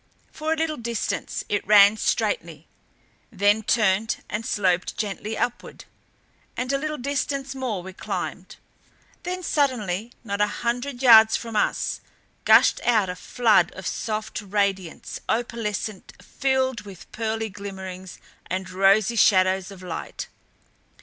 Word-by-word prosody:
For 310 +1 -3
a - - +3
little 320 -1 -1
distance 235 -1 -3
it 205 -2 -2
ran 205 0 +7
straightly, 470 - -1 0.6
then 205 +1 +3
turned 215 0 +1
and 210 +2 -2
sloped 185 -5 0
gently 210 +1 -3
upward; 240 - -4 0.7
and 250 +2 -1
a - - +3
little 305 +1 -3
distance 275 +1 -2
more 245 -9 -3
we 190 +1 -9
climbed. - - -5 0.7
Then 365 +1 -4
suddenly, 235 - 0
not 200 -2 -3
a 210 - +4 0.2
hundred 245 +2 -2
yards 220 -3 +8
from 230 -2 -7
us, 210 - 0 0.4
gushed - - +6
out 215 -6 +2
a 180 - -4
flood 210 -1 +2
of 190 - -9
soft 215 +1 -3
radiance, 200 -3 -2
opalescent, 220 -3 -3
filled 260 -3 -1
with 195 -4 -13
pearly 225 0 -2
glimmerings 190 -2 -8 0.3
and 185 0 -4
rosy 195 +4 +3
shadows 190 -3 +3
of 190 -2 -12
light. 180 - -6
215 Hz, 130 wpm, -24 LUFS, 195-245 Hz, 0.7 s, yards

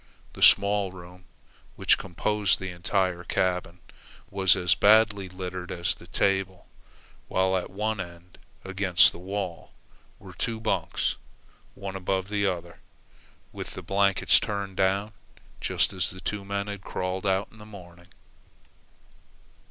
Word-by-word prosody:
The - - -10
small 100 -1 +5
room, 90 0 -13 0.5
which - - +3
composed 100 +2 0
the 95 -1 -5
entire 90 0 -1
cabin, 90 -1 -1 0.5
was 95 -2 +4
as 90 -3 +3
badly 105 -2 +4
littered 90 -1 -6
as 85 -1 -1
the - - -16
table; 95 -2 0 0.6
while 95 0 +1
at 90 - -2
one 105 +2 -2
end, 85 0 -9 0.3
against 95 -2 +4
the - - -11
wall, 95 -1 -5 0.4
were - - -12
two 115 -1 -3
bunks, 110 -1 -1 0.6
one 100 -1 -6
above 95 0 -1
the 100 -1 +1
other, 85 -2 -4 0.7
with - - -8
the - - -7
blankets 100 -1 +3
turned 100 -2 -4
down 100 +3 +1 0.5
just - - +1
as 95 - 0
the 95 -3 -10
two 105 +1 -3
men 100 0 -2
had 100 -2 -6
crawled 95 +1 -3
out 95 +1 +1
in 110 - -17
the - - -11
morning. 90 -4 -13
95 Hz, 135 wpm, -27 LUFS, 90-100 Hz, 0.7 s, small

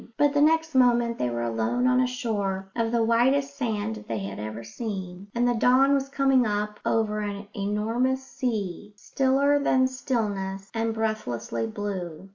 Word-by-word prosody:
But 290 -1 +3
the 290 - +3
next 320 +1 +3
moment 240 -2 +3
they 125 - 0
were 120 0 -2
alone 115 - 0
on 255 0 +4
a 255 - +2
shore 200 -6 -3
of 230 -1 0
the 235 -1 +2
whitest 265 +5 +2
sand 220 -5 -2
that 220 - -10
they 115 - -2
had 100 0 -5
ever 110 +2 -5
seen, 190 - -6
and 240 +1 +2
the 245 - +3
dawn 255 +4 +4
was 275 -1 0
coming 270 -2 +3
up 210 -1 -2
over 215 -1 +1
an 205 -1 -4
enormous 225 +6 0
sea, 210 -6 -4
stiller 275 +5 +2
than 260 -2 +3
stillness 205 -7 -2
and 225 0 0
breathlessly 120 - -2
blue. 185 - -5
225 Hz, 170 wpm, -26 LUFS, 195-255 Hz, -, on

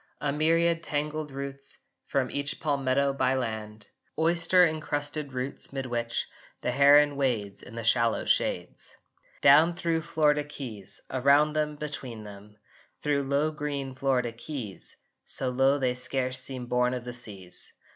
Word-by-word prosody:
A 145 -1 -1
myriad 165 +2 +2
tangled 150 -1 -3
roots 140 0 -6 0.3
From 130 -3 0
each 145 +2 -1
palmetto 140 -2 +1
byland, 110 -6 -2 0.3
Oyster 170 +2 +4
encrusted 150 -2 -2
roots 130 +2 -2
mid 135 -1 -4
which 120 -1 -2 0.3
The 125 - -1
heron 145 +2 +6
wades 110 -8 -1
in 115 - -12
the 115 - -5
shallow 115 0 +2
shades! - - -1 0.4
Down 155 +5 +6
thro 165 -2 0
Florida 150 -2 +2
keys, 130 -9 -5
Around 140 +3 +4
them, 150 -1 -1
between 140 -7 -6
them, 105 0 -12 0.5
Thro 145 -1 +1
low 140 +3 +1
green 145 -3 -4
Florida 130 -2 0
keys, 115 -4 -7 0.3
So 130 - 0
low 135 +2 +3
they 130 -3 +1
scarce 130 0 +1
seem 130 -1 -4
born 125 +1 +1
of 125 -1 -6
the 125 - -5
seas! 100 -7 -4
140 Hz, 140 wpm, -28 LUFS, 125-150 Hz, 0.5 s, heron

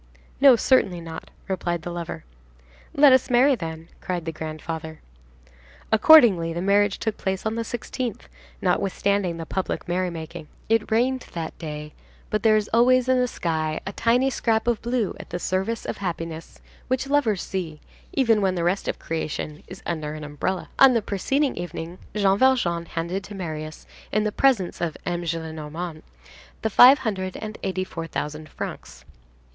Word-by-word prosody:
"No, 270 -2 +8
certainly 215 -7 +2
not!" 165 -1 -8 0.2
replied 175 -3 -2
the 175 - -5
lover. 170 - -5 0.7
"Let 280 -2 +7
us 260 - +3
marry, 255 +3 +5
then," 165 -6 -5
cried 175 -3 -3
the 165 - -2
grandfather. 160 0 -6 0.9
Accordingly, 215 - +6
the 170 - -3
marriage 200 +1 +3
took 220 -2 -3
place 190 +1 -3
on 220 - 0
the 230 - -2
16th, 240 0 -4 0.4
notwithstanding 195 -2 +1
the 165 - -5
public 190 +3 -3
merrymaking. 175 -4 -3 0.2
It 225 -1 +2
rained 250 +3 +1
that 165 -2 -4
day, 150 -2 -6 0.4
but 215 - 0
there 220 -1 +5
is 210 -1 -1
always 250 +2 +4
in 260 0 +3
the 250 - +2
sky 160 -7 -2
a 195 - -3
tiny 250 +5 +2
scrap 225 -3 +1
of 240 -3 0
blue 240 -3 -1
at - - -10
the - - -3
service 190 +6 -2
of - - -4
happiness, 165 -3 -5 0.3
which 260 +1 0
lovers 275 -9 +1
see, 170 -5 -4 0.3
even 230 -6 +3
when 190 -1 +1
the 170 - -1
rest 180 +3 0
of - - -1
creation 155 -1 -4
is 185 - -11
under 155 -3 -3
an 155 - -7
umbrella. 150 +5 -3
On 265 -2 +8
the 225 - +1
preceding 270 +9 0
evening, 175 0 -6 0.2
Jean 200 -1 +3
Valjean 180 -11 +2
handed 170 +4 -3
to 205 - -9
Marius, 155 -4 -6 0.3
in 215 - +2
the 215 - 0
presence 225 -10 +2
of 165 -3 -2
M. 175 0 -2
Gillenormand, 160 0 -5 0.6
the 220 - 0
five 255 +7 +9
hundred 190 -4 -2
and 215 0 -7
eighty 190 -1 -1
four 165 -3 -6
thousand 155 0 -5
francs. 65 - -8
185 Hz, 165 wpm, -24 LUFS, 165-230 Hz, 0.9 s, five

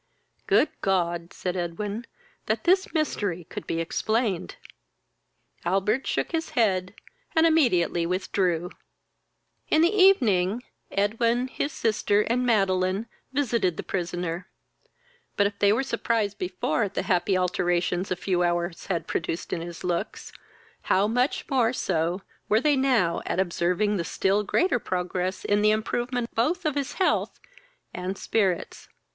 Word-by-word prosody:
"Good - - +4
God! 175 -3 0
(said 180 -1 -4
Edwin,) 200 +6 -4 0.4
that - - 0
this 375 +2 +3
mystery 205 - -1
could - - -8
be 165 - -1
explained!" 210 - -1 1.1
Albert 195 +8 +1
shook - - -1
his 325 -1 -2
head, 185 -4 +1 0.4
and 320 0 +5
immediately 185 - +3
withdrew. 180 -1 0 1.0
In 315 - +4
the 350 +5 +3
evening, 240 - +4 0.3
Edwin, 230 +5 +1
his 280 - -2
sister, 210 -4 +1
and 240 +4 0
Madeline, 195 -3 +2 0.3
visited 235 - 0
the - - -4
prisoner; 175 -1 -3 0.9
but, 205 - +4
if 200 0 -2
they 200 0 +5
were 230 +5 +2
surprised 220 -6 -1
before 180 -4 -1
at 200 -1 -2
the - - 0
happy 185 +1 +1
alteration 180 0 0
a 185 - 0
few 180 0 -1
hours 175 0 -1
had 180 -4 -1
produced 165 +1 -3
in 165 - -2
his 170 0 -8
looks, 180 +3 -3 0.6
how 195 +2 +4
much 245 +5 0
more 255 -5 +2
so 175 -3 -1 0.3
were 215 - +4
they 295 +3 +3
now 250 -11 +2
at - - -1
observing 190 +3 +1
the 170 - -1
still 195 +4 +1
greater 245 - +1
progress 185 -1 -2
in 205 0 +2
the 210 - +5
improvement 240 +3 -1
both 320 +11 0
of 305 - +1
his 280 -1 -2
health 380 - 0 0.5
and 185 +2 -4
spirits. 195 -6 -1
200 Hz, 140 wpm, -26 LUFS, 180-235 Hz, 1.1 s, and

